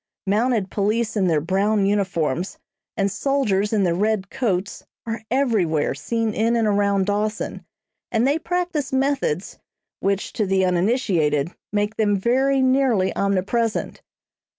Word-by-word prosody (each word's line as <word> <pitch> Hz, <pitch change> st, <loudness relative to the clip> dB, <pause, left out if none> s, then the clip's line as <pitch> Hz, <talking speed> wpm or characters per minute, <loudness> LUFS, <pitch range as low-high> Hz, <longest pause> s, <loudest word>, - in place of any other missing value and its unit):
Mounted 210 Hz, 0 st, +1 dB
police 215 Hz, +2 st, 0 dB
in 195 Hz, -3 st, +2 dB
their 160 Hz, -3 st, +2 dB
brown 195 Hz, +5 st, +1 dB
uniforms 185 Hz, -4 st, -1 dB, 0.4 s
and 200 Hz, -1 st, +1 dB
soldiers 210 Hz, -5 st, 0 dB
in 210 Hz, -3 st, +2 dB
their 175 Hz, -2 st, +2 dB
red 200 Hz, +1 st, 0 dB
coats 200 Hz, -7 st, -2 dB, 0.2 s
are 225 Hz, -1 st, -4 dB
everywhere 215 Hz, -, +1 dB
seen 220 Hz, +10 st, -2 dB
in 230 Hz, +3 st, +1 dB
and 225 Hz, -2 st, +2 dB
around 200 Hz, -1 st, +2 dB
Dawson, 210 Hz, +1 st, -2 dB, 0.5 s
and 230 Hz, +1 st, +2 dB
they 290 Hz, +3 st, +2 dB
practice 345 Hz, -5 st, -2 dB
methods, 265 Hz, -, -1 dB, 0.4 s
which, 195 Hz, 0 st, -1 dB
to 210 Hz, -, -1 dB
the 190 Hz, 0 st, +2 dB
uninitiated, 175 Hz, -, +1 dB, 0.2 s
make 210 Hz, +1 st, -1 dB
them 205 Hz, -2 st, +2 dB
very 265 Hz, +6 st, +2 dB
nearly 255 Hz, -7 st, +2 dB
omnipresent. 200 Hz, +4 st, -1 dB
210 Hz, 130 wpm, -22 LUFS, 190-235 Hz, 0.5 s, in